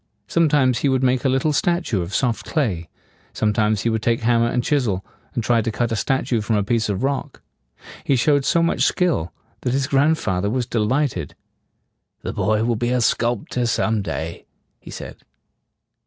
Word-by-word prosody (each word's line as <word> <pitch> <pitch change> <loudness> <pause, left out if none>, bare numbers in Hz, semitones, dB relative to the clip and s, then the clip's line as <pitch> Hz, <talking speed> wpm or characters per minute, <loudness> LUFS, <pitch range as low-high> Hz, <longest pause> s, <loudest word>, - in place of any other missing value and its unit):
Sometimes 145 -7 +3
he 140 - +1
would 130 0 +1
make 130 -1 +2
a - - +4
little 135 +4 +1
statue 170 - 0
of 85 +3 -4
soft 120 -4 0
clay; 100 - -1 0.4
sometimes 105 -1 +1
he 115 - +1
would 110 -1 -1
take 115 +1 +1
hammer 115 0 +3
and 120 0 0
chisel, 115 -11 0 0.3
and 120 - -1
try 115 0 +3
to 115 +1 -2
cut 120 +2 -1
a - - +1
statue 120 +1 0
from 110 +1 0
a 105 - +2
piece 110 0 0
of 100 +4 -2
rock. 140 0 -3 0.6
He 140 - +2
showed 145 +2 +3
so 170 +5 +2
much 165 - 0
skill 165 - +1 0.3
that 125 - -1
his 135 0 +1
grandfather 135 - +1
was 125 +2 -1
de 115 - -2
light 130 +5 +1
ed. 85 -5 -6 0.9
"The - - -4
boy 110 +3 +1
will 120 0 +1
be 120 +2 -1
a 125 0 +1
sculp 120 -1 0
tor 125 -1 -1
some 110 -2 +1
day," 80 -1 -5 0.3
he - - -13
said. - - -8
120 Hz, 190 wpm, -21 LUFS, 105-135 Hz, 0.9 s, a